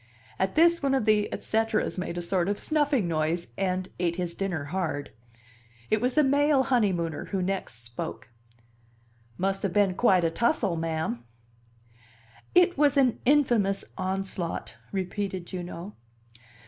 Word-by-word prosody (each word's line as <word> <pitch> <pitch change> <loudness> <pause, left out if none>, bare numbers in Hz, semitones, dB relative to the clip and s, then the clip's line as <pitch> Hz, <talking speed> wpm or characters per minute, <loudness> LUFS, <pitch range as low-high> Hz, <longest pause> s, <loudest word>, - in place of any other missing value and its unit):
At 190 0 0
this 340 +2 +5
one 275 -1 +2
of 260 - 0
the 210 -1 +3
et - - -5
ceteras 220 -3 0
made 180 -1 -4
a 175 - -2
sort 180 +1 0
of 205 - 0
snuffing 290 - +1
noise, 165 +1 -1
and 185 -1 -1
ate 170 -1 0
his 175 -1 -3
dinner 180 -5 -2
hard. 160 -6 -2 0.8
It 215 - +3
was 250 +1 0
the 305 - +5
male 285 0 +3
honeymooner 185 - 0
who 190 -2 -2
next 180 -12 -4
spoke. 115 0 -6 1.1
"Must 195 +1 0
have 195 -3 -1
been 200 -2 +3
quite 185 -3 +3
a 165 - +2
tussle, 225 - +1
ma'am." 160 -7 -2 1.3
"It 355 -3 +5
was 290 -1 +4
an 255 -4 +3
infamous 240 -8 +3
onslaught!" 185 -2 -3 0.2
repeated 190 -1 -3
Juno. 175 +2 -7
195 Hz, 145 wpm, -27 LUFS, 175-240 Hz, 1.3 s, this